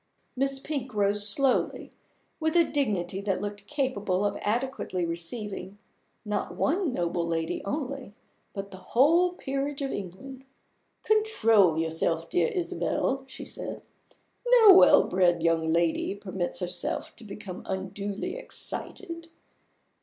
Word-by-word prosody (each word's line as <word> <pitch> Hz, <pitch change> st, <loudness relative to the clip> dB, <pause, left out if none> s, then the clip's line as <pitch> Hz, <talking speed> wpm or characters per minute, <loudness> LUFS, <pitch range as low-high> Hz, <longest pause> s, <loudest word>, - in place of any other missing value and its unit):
Miss 270 Hz, +1 st, 0 dB
Pink 265 Hz, -5 st, -4 dB
rose 205 Hz, 0 st, +3 dB
slowly, 265 Hz, +4 st, +1 dB, 0.5 s
with 315 Hz, 0 st, 0 dB
a 340 Hz, -, +7 dB
dignity 200 Hz, -, -1 dB
that 195 Hz, -2 st, -1 dB
looked 205 Hz, 0 st, -6 dB
capable 230 Hz, -10 st, -1 dB
of 205 Hz, 0 st, 0 dB
adequately 225 Hz, -5 st, -1 dB
receiving 190 Hz, +4 st, -5 dB, 0.5 s
not 210 Hz, 0 st, -2 dB
one 340 Hz, +1 st, +1 dB
noble 170 Hz, -5 st, -1 dB
lady 165 Hz, -1 st, -2 dB
only, 270 Hz, 0 st, -4 dB, 0.4 s
but 200 Hz, 0 st, -6 dB
the 190 Hz, -, -9 dB
whole 315 Hz, -, +3 dB
peerage 275 Hz, -2 st, -3 dB
of 270 Hz, -, -2 dB
England. 255 Hz, +8 st, -7 dB, 0.6 s
"Control 230 Hz, -, +4 dB
yourself, 160 Hz, 0 st, 0 dB
dear -, -, +3 dB
Isabel," 340 Hz, -, -1 dB
she 260 Hz, -, -9 dB
said. -, -, -7 dB, 0.6 s
"No 465 Hz, -5 st, +9 dB
well 375 Hz, -, +8 dB
bred 175 Hz, -2 st, +2 dB
young 165 Hz, -1 st, +2 dB
lady 170 Hz, +3 st, +1 dB
permits 190 Hz, -2 st, -3 dB
herself 180 Hz, 0 st, -2 dB
to 240 Hz, -, -10 dB
become 200 Hz, -3 st, -8 dB
unduly 195 Hz, +1 st, -4 dB
excited. 335 Hz, -8 st, -5 dB
210 Hz, 125 wpm, -27 LUFS, 185-275 Hz, 0.6 s, No